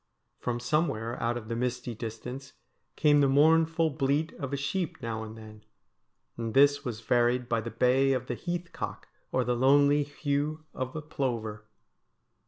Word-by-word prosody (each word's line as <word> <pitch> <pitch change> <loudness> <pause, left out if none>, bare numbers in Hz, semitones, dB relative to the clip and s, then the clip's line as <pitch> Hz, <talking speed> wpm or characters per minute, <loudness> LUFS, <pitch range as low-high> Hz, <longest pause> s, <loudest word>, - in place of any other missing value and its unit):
From 120 -1 -2
some 150 +7 +1
where 115 -3 -4
out 120 +1 0
of 110 -2 -8
the 115 - -3
misty 125 0 -2
distance 125 +4 -7 0.4
came 145 -2 +4
the 140 - +5
mournful 160 +3 +4
bleat 145 +2 0
of 140 -3 -4
a 140 - -1
sheep 140 +5 -2
now 110 -1 -4
and 110 0 -8
then, 110 -1 -12 0.7
and 115 0 -4
this 140 +1 +5
was 115 -5 -4
varied 120 +1 +2
by 115 -1 0
the 115 - -5
bay 130 +4 +3
of 130 -1 -2
the - - -3
heath 175 -1 -4
cock - - -6 0.2
or 130 - +2
the 125 0 0
lonely 140 +3 +4
whew 145 +2 -2
of 130 0 -4
the 155 - -5
plover. 115 -8 -3
130 Hz, 175 wpm, -29 LUFS, 115-145 Hz, 0.7 s, the